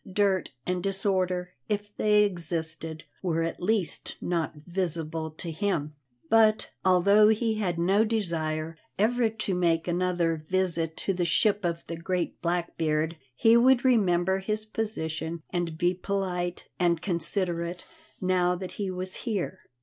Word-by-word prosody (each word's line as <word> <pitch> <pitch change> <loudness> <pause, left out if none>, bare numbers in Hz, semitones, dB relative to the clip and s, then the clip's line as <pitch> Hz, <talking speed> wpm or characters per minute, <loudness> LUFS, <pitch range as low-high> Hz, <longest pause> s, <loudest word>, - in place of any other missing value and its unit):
Dirt 195 -1 +2 0.2
and 180 0 -1
disorder, 185 -2 0 0.2
if 205 0 -3
they 210 0 +4
existed, 165 -4 -3 0.2
were 165 -3 0
at 165 - -4
least 195 -1 -1
not 170 -3 -1
visible 165 -3 -2
to 160 +2 -6
him. 160 -4 -1 0.3
But, 220 0 +4
although 200 +3 +5
he 220 0 +1
had 180 -5 -1
no 190 +5 +3
desire 165 -7 -2 0.2
ever 230 +2 +2
to 215 -3 -3
make 170 -2 +1
another 175 -2 0
visit 170 -4 +1
to 195 - +2
the 180 -1 -1
ship 205 +4 +2
of 170 -1 -2
the 165 - -5
great 175 +1 -2
Blackbeard, 165 -2 0 0.2
he 225 - +5
would 245 +1 +5
remember 190 -6 +3
his 215 +2 -1
position 165 -7 -3
and 175 -3 -2
be 175 +2 +2
polite 180 -2 -2
and 170 -2 +3
considerate 175 0 0 0.3
now 180 -1 +2
that 185 0 -6
he 195 - -1
was 185 0 -4
here. 200 -5 -3
180 Hz, 140 wpm, -27 LUFS, 170-205 Hz, 0.3 s, although